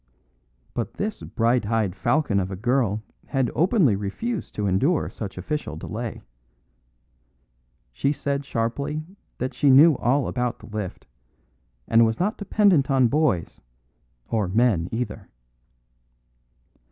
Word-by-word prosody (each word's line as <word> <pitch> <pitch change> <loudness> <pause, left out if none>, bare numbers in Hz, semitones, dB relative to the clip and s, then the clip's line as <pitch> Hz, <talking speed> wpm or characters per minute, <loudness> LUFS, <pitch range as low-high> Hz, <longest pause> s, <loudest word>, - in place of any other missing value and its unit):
But 120 - -4
this 210 +1 -3
bright 115 -1 0
eyed 110 -4 0
falcon 115 -1 +1
of 95 -1 -2
a 95 - -4
girl 110 0 0 0.2
had 135 -3 0
openly 170 - +3
refused 170 - -4
to 105 - -1
endure 130 - +1
such 100 -4 -7
official 90 - -3
delay. 110 +7 -6 1.7
She 140 - 0
said 140 -1 -2
sharply 140 +5 -2 0.3
that 130 +1 -3
she 145 - +2
knew 145 +4 +7
all 135 +3 +1
about 125 -1 -2
the - - -14
lift, 105 -4 -6 0.8
and 115 +1 +5
was 110 0 +1
not 205 +4 0
dependent 200 -9 +3
on 130 -3 +4
boys 140 - 0 0.7
or 110 -4 0
men 95 -4 +2
either. 120 +2 -4
120 Hz, 125 wpm, -24 LUFS, 105-145 Hz, 1.7 s, knew